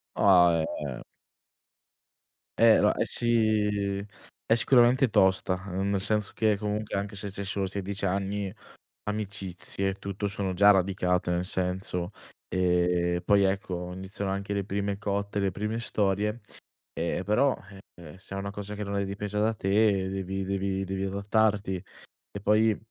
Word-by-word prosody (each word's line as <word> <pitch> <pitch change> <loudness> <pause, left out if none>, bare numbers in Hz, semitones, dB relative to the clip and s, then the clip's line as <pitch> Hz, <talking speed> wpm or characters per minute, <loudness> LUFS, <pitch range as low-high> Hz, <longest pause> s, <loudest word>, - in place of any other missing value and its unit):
Ah, 85 -4 +5 0.2
eh. 65 -3 -5 1.6
Eh 115 -1 +6
no - - +4
è - - 0
si 105 -4 +1 0.4
è 115 - +4
sicuramente 125 +1 +4
tosta, 95 -1 +2
uhm, 95 +2 -1
nel 100 -1 0
senso 105 0 0
che 110 -2 +2
comunque 105 0 -3
anche 100 +1 -4
se 100 +1 -4
c'hai 100 0 -5
solo 95 0 -1
16 100 +1 -4
anni, 100 +1 -2 0.5
amicizie 100 -2 -3
e - - -4
tutto, 100 +1 -4
sono 95 -2 -2
già 100 +2 +6
radicate 90 -2 +1
nel 90 +1 0
senso, 90 0 -2 0.4
e 90 -1 +1
poi 100 +2 +4
ecco, 90 -2 -2
iniziano 95 +1 -5
anche 100 +1 -3
le 100 -1 -1
prime 100 0 -2
cotte, 100 0 -2
le 100 -1 +1
prime 105 +4 -3
storie, 105 +1 0 0.5
e 85 +2 -2
però, 130 +6 +2 0.4
eh, 85 0 -12
se 95 +1 -9
è - - -3
una 100 0 -4
cosa 105 +1 -6
che 105 - -4
non 100 0 -3
è 100 - 0
dipesa 105 +1 -3
da 110 +1 +2
te 100 -2 +2
devi 95 0 -3
devi 95 0 -1
devi 95 0 -3
adattarti. 100 0 +1 0.6
E 100 - -6
poi, 110 +1 +3
100 Hz, 150 wpm, -28 LUFS, 95-105 Hz, 1.6 s, Eh